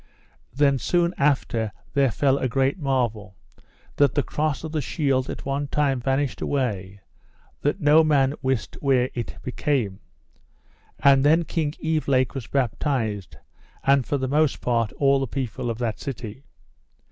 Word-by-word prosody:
Then 140 -1 +2
soon 175 +3 +1
after 125 -6 +1 0.2
there 140 -2 +3
fell 135 +3 +1
a - - 0
great 135 +6 0
marvel, 120 - -1 0.6
that 140 -2 +3
the 145 - +2
cross 150 -1 -2
of 160 - -5
the 155 -1 -1
shield 135 -2 0
at - - -6
one 140 +1 -2
time 140 -2 +1
vanished 135 +1 -1
away 100 -8 -2 0.6
that 145 +7 0
no 150 +2 +6
man 140 -3 +3
wist 130 -3 -2
where 130 -3 +2
it 120 -2 -5
became. 125 -7 -1 1.0
And 135 0 +5
then 160 +4 +4
King 155 -3 -1
Evelake 150 -6 0
was 135 -5 -6
baptised, 115 - -1 0.5
and 135 -1 +4
for 145 - -1
the 130 -1 -2
most 150 +1 +2
part 115 -3 0
all 140 -1 +3
the 135 - -2
people 125 -1 -4
of 115 - -3
that 115 -3 -2
city. 130 -1 -7
135 Hz, 150 wpm, -24 LUFS, 125-145 Hz, 1.0 s, no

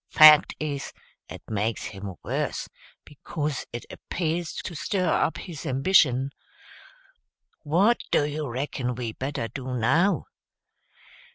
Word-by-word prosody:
Fact 155 -1 +8
is, 145 -3 -4 0.4
it - - -9
makes 110 +1 -1
him 95 -1 -7
worse, - - -2 0.4
becuz 150 0 -4
it 120 - -6
appears 170 -1 -3
to 185 - -6
stir 185 +3 -1
up - - +1
his 165 -7 -8
ambition. 135 -2 +3 1.3
What 185 +10 +3
do 145 - +3
you 150 -1 -3
reckon 125 0 -3
we 115 -2 -3
better 135 -2 -3
do, 130 +1 -5
now?" 160 - +2
145 Hz, 115 wpm, -26 LUFS, 125-160 Hz, 1.3 s, Fact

